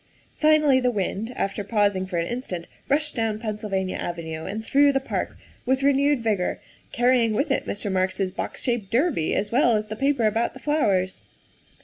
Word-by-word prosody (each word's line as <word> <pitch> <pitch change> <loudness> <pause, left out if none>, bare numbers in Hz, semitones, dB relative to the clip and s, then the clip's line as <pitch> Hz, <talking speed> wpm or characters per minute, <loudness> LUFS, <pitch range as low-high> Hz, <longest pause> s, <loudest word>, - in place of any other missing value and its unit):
Finally 305 -3 +5
the 250 -1 +2
wind, 210 +1 -2
after 195 +1 -2
pausing 205 -3 +1
for 180 -2 -3
an 170 - 0
instant, 185 -7 -4 0.2
rushed 295 +2 +1
down 225 -3 -1
Pennsylvania 210 -4 -3
Avenue 160 -2 -5
and 215 +3 -5
through 285 +2 +4
the 270 - +1
park 265 - -4 0.3
with 265 +2 +1
renewed 280 -1 +3
vigor, 205 -5 0 0.3
carry 245 +1 +3
ing 225 -1 +1
with 275 +6 0
it - - 0
Mr. 205 0 -3
Marks 185 +1 0
's 190 -2 0
box 190 - -5
shaped 235 -6 -1
derby 255 - +1
as 205 +1 -1
well 240 -2 +4
as 215 0 -2
the 215 - -4
paper 275 -1 +1
about 225 +2 0
the - - -9
flowers. 200 -12 0
220 Hz, 190 wpm, -24 LUFS, 195-265 Hz, 0.3 s, Finally